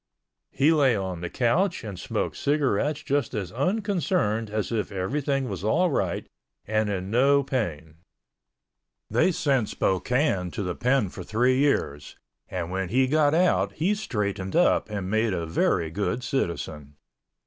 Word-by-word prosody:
He 145 Hz, +4 st, +3 dB
lay 140 Hz, -6 st, +4 dB
on 95 Hz, -4 st, -3 dB
the 90 Hz, -, -4 dB
couch 170 Hz, +10 st, +1 dB
and 100 Hz, -5 st, -7 dB
smoked -, -, -2 dB
cigarettes 145 Hz, 0 st, 0 dB
just 140 Hz, -2 st, -1 dB
as 95 Hz, -4 st, -3 dB
unconcerned 180 Hz, -, 0 dB
as 105 Hz, +1 st, -2 dB
if 110 Hz, -3 st, -2 dB
everything 135 Hz, +8 st, -1 dB
was 95 Hz, -4 st, -5 dB
all 170 Hz, -, +2 dB
right -, -, -1 dB, 0.4 s
and 110 Hz, 0 st, 0 dB
in 95 Hz, -1 st, -3 dB
no 140 Hz, +4 st, +4 dB
pain. 85 Hz, -, -3 dB, 1.1 s
They 120 Hz, -, +3 dB
sent 135 Hz, -, +1 dB
Spokane 95 Hz, -, 0 dB
to 105 Hz, -, -3 dB
the 90 Hz, -2 st, -2 dB
Pen 125 Hz, -1 st, +1 dB
for -, -, -8 dB
three 125 Hz, +4 st, +2 dB
years 75 Hz, -, 0 dB, 0.3 s
and 90 Hz, -2 st, -4 dB
when 95 Hz, -1 st, -2 dB
he 130 Hz, +5 st, +3 dB
got 150 Hz, +2 st, +3 dB
out 180 Hz, +2 st, +2 dB
he 180 Hz, +6 st, +1 dB
straightened 100 Hz, -, -3 dB
up -, -, +3 dB
and 100 Hz, -3 st, -4 dB
made 110 Hz, 0 st, +1 dB
a 85 Hz, -2 st, -2 dB
very 80 Hz, 0 st, 0 dB
good 105 Hz, +7 st, -2 dB
citizen. 80 Hz, -, -3 dB
115 Hz, 150 wpm, -26 LUFS, 95-140 Hz, 1.1 s, lay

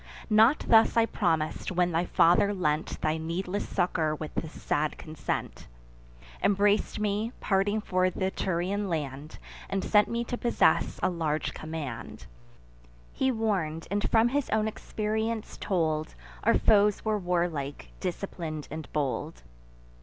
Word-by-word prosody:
Not 225 Hz, +7 st, +5 dB
thus 225 Hz, 0 st, +5 dB
I 230 Hz, -, +6 dB
promis'd, 160 Hz, -8 st, -1 dB
when 180 Hz, -1 st, +1 dB
thy 165 Hz, +2 st, +1 dB
father 190 Hz, +4 st, +4 dB
lent 155 Hz, -3 st, -1 dB
Thy 155 Hz, 0 st, +1 dB
needless 180 Hz, +5 st, -3 dB
succour 160 Hz, -3 st, 0 dB
with 155 Hz, 0 st, -7 dB
a 160 Hz, -, -2 dB
sad 150 Hz, 0 st, -2 dB
consent; 155 Hz, -1 st, -5 dB, 0.7 s
Embrac'd 205 Hz, +1 st, +2 dB
me, 210 Hz, +3 st, -1 dB
parting 205 Hz, +2 st, +1 dB
for 185 Hz, -2 st, +1 dB
th' -, -, -13 dB
Etrurian 190 Hz, +1 st, -1 dB
land, 150 Hz, -2 st, -4 dB, 0.3 s
And 195 Hz, -1 st, -1 dB
sent 210 Hz, -1 st, +4 dB
me 235 Hz, 0 st, -1 dB
to 245 Hz, +1 st, -4 dB
possess 240 Hz, -, +2 dB
a -, -, +4 dB
large 160 Hz, -3 st, -1 dB
command. 155 Hz, -6 st, -6 dB, 0.9 s
He 265 Hz, -, +1 dB
warn'd, 190 Hz, -9 st, -1 dB
and 205 Hz, +1 st, 0 dB
from 225 Hz, +1 st, +4 dB
his 280 Hz, +1 st, -1 dB
own 220 Hz, 0 st, +1 dB
experience 220 Hz, +1 st, -3 dB
told, 160 Hz, -5 st, -1 dB, 0.3 s
Our -, -, +4 dB
foes 210 Hz, -1 st, +3 dB
were 215 Hz, -1 st, +1 dB
warlike, 165 Hz, -, -2 dB
disciplin'd, 155 Hz, -, -4 dB
and 155 Hz, +1 st, -7 dB
bold. 135 Hz, -, -2 dB
185 Hz, 135 wpm, -28 LUFS, 155-210 Hz, 0.9 s, I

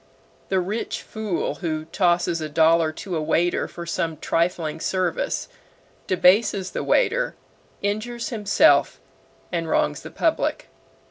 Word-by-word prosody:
The 190 Hz, -, +2 dB
rich 200 Hz, +5 st, -3 dB
fool 215 Hz, -5 st, -3 dB
who 155 Hz, -3 st, -2 dB
tosses 175 Hz, -1 st, +1 dB
a 155 Hz, -, -4 dB
dollar 160 Hz, +1 st, +4 dB
to 185 Hz, +2 st, -5 dB
a 160 Hz, -, -1 dB
waiter 170 Hz, +3 st, +1 dB
for 170 Hz, -, -8 dB
some 165 Hz, -1 st, -2 dB
trifling 165 Hz, -1 st, -1 dB
service, 190 Hz, -, -1 dB, 0.6 s
debases 185 Hz, +1 st, +3 dB
the -, -, -3 dB
waiter, -, -, +1 dB, 0.5 s
injures 220 Hz, +4 st, -2 dB
himself, 210 Hz, -4 st, +3 dB, 0.5 s
and 165 Hz, -2 st, -2 dB
wrongs -, -, +1 dB
the -, -, -9 dB
public. -, -, -1 dB
180 Hz, 125 wpm, -23 LUFS, 165-205 Hz, 0.6 s, dollar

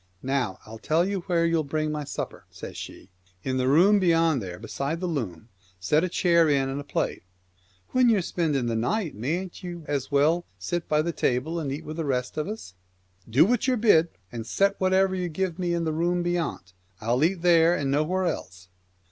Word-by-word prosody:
" 90 Hz, +1 st, -37 dB
Now 130 Hz, -7 st, -1 dB
I'll 110 Hz, +1 st, -10 dB
tell 160 Hz, -, +1 dB
you 200 Hz, -1 st, -1 dB
where 170 Hz, -2 st, +2 dB
you'll 165 Hz, -1 st, +2 dB
bring 155 Hz, +1 st, -2 dB
my 150 Hz, -1 st, -3 dB
supper," -, -, -6 dB
says -, -, -9 dB
she. -, -, -9 dB, 0.2 s
" 90 Hz, 0 st, -35 dB
In 130 Hz, 0 st, -1 dB
the 130 Hz, 0 st, +1 dB
room 185 Hz, +9 st, +5 dB
beyond 165 Hz, -6 st, +3 dB
there 90 Hz, -3 st, -6 dB
beside 140 Hz, -, -4 dB
the 185 Hz, -, -3 dB
loom 115 Hz, -, -4 dB
— 95 Hz, -1 st, -33 dB
set 155 Hz, +3 st, +4 dB
a 185 Hz, -, 0 dB
chair 170 Hz, -2 st, +3 dB
in 135 Hz, -2 st, +2 dB
and 135 Hz, +2 st, -3 dB
a -, -, -9 dB
plate." 145 Hz, -, -2 dB, 0.4 s
" 95 Hz, 0 st, -36 dB
When 255 Hz, -1 st, +4 dB
ye're 210 Hz, -5 st, +3 dB
spending 150 Hz, -8 st, 0 dB
the 115 Hz, -1 st, -1 dB
night, 165 Hz, -, -1 dB
mayn't 170 Hz, -, -4 dB
ye 175 Hz, -1 st, -6 dB
as 140 Hz, -2 st, -3 dB
well 155 Hz, +5 st, +3 dB
sit 160 Hz, -, -3 dB
by 150 Hz, 0 st, +3 dB
the 170 Hz, -, -1 dB
table 155 Hz, +7 st, 0 dB
and 145 Hz, -4 st, -3 dB
eat 150 Hz, +4 st, -5 dB
with 155 Hz, +1 st, -6 dB
the 165 Hz, -, -1 dB
rest 125 Hz, -2 st, -1 dB
of 155 Hz, +2 st, -2 dB
us? 210 Hz, -, -7 dB, 0.2 s
" 90 Hz, 0 st, -40 dB
" 95 Hz, +4 st, -24 dB
Do 130 Hz, +8 st, +5 dB
what 245 Hz, +4 st, +1 dB
you're 255 Hz, -1 st, +2 dB
bid, 175 Hz, -7 st, +4 dB, 0.2 s
and 115 Hz, -2 st, -6 dB
set 200 Hz, +9 st, +2 dB
whatever 190 Hz, 0 st, +3 dB
you 180 Hz, -2 st, -2 dB
give 180 Hz, +1 st, -2 dB
me 175 Hz, -1 st, 0 dB
in 170 Hz, 0 st, 0 dB
the 160 Hz, -1 st, -1 dB
room 175 Hz, +2 st, 0 dB
bey 175 Hz, 0 st, 0 dB
ant. 95 Hz, -, -4 dB, 0.3 s
I'll 120 Hz, +5 st, +1 dB
eat 175 Hz, +1 st, +1 dB
there 170 Hz, -1 st, +5 dB
and 140 Hz, -5 st, -1 dB
nowhere 165 Hz, +6 st, +1 dB
else." 90 Hz, -, -5 dB
155 Hz, 230 wpm, -26 LUFS, 125-175 Hz, 0.4 s, room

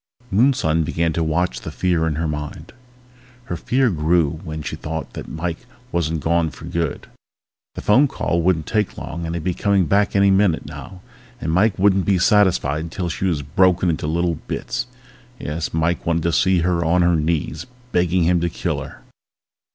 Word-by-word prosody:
Moonson 95 Hz, -, +3 dB
began 80 Hz, +1 st, 0 dB
to 85 Hz, -, 0 dB
watch 85 Hz, +3 st, -1 dB
the -, -, -6 dB
fear 85 Hz, -3 st, 0 dB
in 80 Hz, -, -1 dB
her 80 Hz, +2 st, -1 dB
mind... 75 Hz, +3 st, -6 dB, 0.7 s
Her 90 Hz, -, -4 dB
fear 125 Hz, -, +1 dB
grew 80 Hz, -1 st, +1 dB
when 80 Hz, -3 st, -6 dB
she -, -, -4 dB
thought 80 Hz, +1 st, -5 dB
that -, -, -7 dB
Mike 80 Hz, +1 st, -4 dB, 0.3 s
wasn't 80 Hz, -2 st, -1 dB
gone 85 Hz, 0 st, +1 dB
for -, -, -12 dB
good. 85 Hz, -3 st, -3 dB, 0.7 s
The -, -, -6 dB
phone 130 Hz, +8 st, +5 dB
call 85 Hz, -9 st, -1 dB
wouldn't 80 Hz, -3 st, +1 dB
take 105 Hz, -3 st, -1 dB
long 85 Hz, 0 st, -5 dB
and 85 Hz, -, -3 dB
he'd 85 Hz, -, -4 dB
be 90 Hz, +1 st, 0 dB
coming 100 Hz, 0 st, +2 dB
back 100 Hz, +6 st, +2 dB
any 100 Hz, 0 st, +5 dB
minute 95 Hz, -4 st, +2 dB
now. 95 Hz, -1 st, -10 dB, 0.4 s
And 80 Hz, -, -2 dB
Mike 95 Hz, +5 st, +2 dB
wouldn't 95 Hz, -1 st, +3 dB
be 100 Hz, -2 st, +3 dB
satisfied 90 Hz, -, +3 dB
until 85 Hz, +2 st, -4 dB
she 90 Hz, +3 st, -3 dB
was 80 Hz, -6 st, 0 dB
broken 90 Hz, +4 st, +3 dB
into 75 Hz, -1 st, -3 dB
little 85 Hz, 0 st, 0 dB
bits. -, -, -3 dB, 0.5 s
Yes, 80 Hz, +2 st, -3 dB
Mike 80 Hz, +2 st, 0 dB
wanted 85 Hz, -1 st, 0 dB
to 85 Hz, -, +1 dB
see 95 Hz, -1 st, +3 dB
her 85 Hz, 0 st, +1 dB
on 85 Hz, +2 st, +3 dB
her 85 Hz, 0 st, +3 dB
knees, 80 Hz, 0 st, -1 dB, 0.2 s
begging 90 Hz, 0 st, +2 dB
him 85 Hz, +1 st, +2 dB
to 85 Hz, -, 0 dB
kill -, -, -3 dB
her! -, -, -11 dB
85 Hz, 185 wpm, -21 LUFS, 80-95 Hz, 0.7 s, phone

